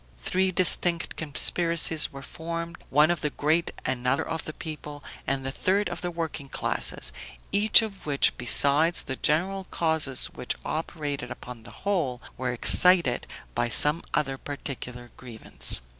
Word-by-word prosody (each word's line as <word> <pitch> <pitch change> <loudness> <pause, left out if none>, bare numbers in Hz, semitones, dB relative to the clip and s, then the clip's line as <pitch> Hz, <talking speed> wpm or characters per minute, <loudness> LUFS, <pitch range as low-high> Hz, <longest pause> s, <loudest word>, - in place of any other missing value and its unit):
Three 185 0 -1
distinct 175 -1 +4
conspiracies 165 +1 +2
were 135 0 -10
formed; 170 +2 -6
one 150 +4 +4
of 175 - -3
the 150 - -1
great; 155 +4 0 0.2
another 130 +4 -1
of 165 -1 -4
the 155 - -6
people, 150 -2 -9 0.2
and 135 0 -1
the 135 - -3
third 195 +8 0
of - - -6
the 180 - -3
working 160 -4 -6
classes; - - -2 0.4
each 215 +2 +6
of 200 -6 -8
which, 140 -2 +2
besides 145 +7 +3
the 130 - -5
general 185 +8 0
causes 160 -7 -1
which 125 - -4
operated 150 -4 -5
upon 125 -1 -10
the 110 - -13 0.2
whole, 165 -12 -1 0.2
were 125 0 -3
excited 170 +2 +5 0.3
by 120 - -1
some 150 +7 +3
other 135 -2 -2
particular 125 -4 -8
grievance. 115 - 0
150 Hz, 145 wpm, -26 LUFS, 135-170 Hz, 0.4 s, each